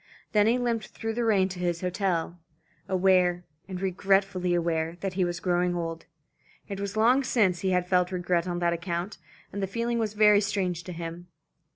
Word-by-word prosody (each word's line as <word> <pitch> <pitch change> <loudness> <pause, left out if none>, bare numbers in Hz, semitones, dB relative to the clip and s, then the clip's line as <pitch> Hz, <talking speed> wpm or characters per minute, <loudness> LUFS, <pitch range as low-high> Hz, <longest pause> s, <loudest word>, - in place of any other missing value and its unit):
Then 210 0 +4
he 235 +2 +3
limped 235 -4 -1
through 225 0 -5
the 240 +1 -1
rain 200 -5 +3
to 180 -1 -7
his 175 -1 -1
hotel, 180 -2 -1 0.5
aware, 180 -2 +3 0.2
and 185 -2 -5
regretfully 190 -1 +1
aware, 165 -1 -1
that 195 -2 -2
he 185 0 +1
was 175 -1 -2
growing 180 0 +1
old. 165 -1 -4 0.6
It 200 -1 -5
was 200 +1 -4
long 245 +5 +4
since 200 -9 +2
he 190 - -1
had 180 -1 +1
felt 180 0 +2
regret 175 -1 0
on 175 -1 -2
that 170 -1 +1
account, 170 +3 -4 0.3
and 200 - -3
the 195 - 0
feeling 235 +3 -1
was 215 -2 -2
very 210 -1 +6
strange 190 -4 -1
to 180 - -6
him. 170 +1 -7
185 Hz, 190 wpm, -27 LUFS, 175-205 Hz, 0.6 s, very